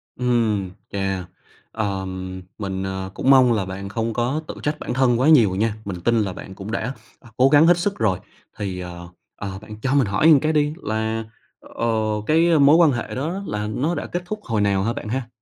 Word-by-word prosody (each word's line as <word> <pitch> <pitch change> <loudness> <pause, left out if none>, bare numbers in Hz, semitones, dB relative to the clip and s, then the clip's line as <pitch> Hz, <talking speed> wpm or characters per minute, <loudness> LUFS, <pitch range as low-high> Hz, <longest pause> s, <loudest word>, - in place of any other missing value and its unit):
Ừm, 115 -6 0 0.2
chà. 95 -2 -2 0.5
Ờm, 95 -3 -4 0.2
mình, 95 -2 -3
ờ, 95 0 -4
cũng 130 - -1
mong 130 -3 +6
là 100 -4 0
bạn 95 +1 -6
không 115 +1 -2
có 125 +7 -1
tự - - -6
trách 150 +1 -1
bản - - -4
thân 125 -2 +2
quá 135 +5 +4
nhiều 115 -12 +6
nha. 105 +2 0
Mình 90 -3 -5
tin 115 +3 +2
là 95 -3 -2
bạn 95 - -10
cũng 100 +3 -7
đã, 125 +3 -2 0.3
à, 120 - -16
cố 130 +2 +5
gắng 150 +3 +6
hết 175 - +6
sức 195 +3 -1
rồi. 100 -5 +1 0.4
Thì, 95 -3 -4
ờ, 85 -1 -8 0.3
ờ, 95 -1 -6
bạn 110 0 -10
cho 135 +1 0
mình 135 -6 +3
hỏi 100 +9 +1
một 150 -4 +8
cái 155 +2 0
đi 150 0 +2
là, 110 +1 -1 0.4
ờ, 115 - -5 0.4
cái 165 0 +4
mối 140 +2 +7
quan 165 -3 +6
hệ 120 -1 -4
đó 170 +9 -3
là 105 - -3
nó 140 +11 -1
đã - - -4
kết 175 0 -4
thúc 215 +4 -5
hồi 110 -3 -1
nào 100 -1 +2
ha 115 +2 0
bạn 105 - -6
ha? 130 0 -2
115 Hz, 220 wpm, -22 LUFS, 95-135 Hz, 0.5 s, một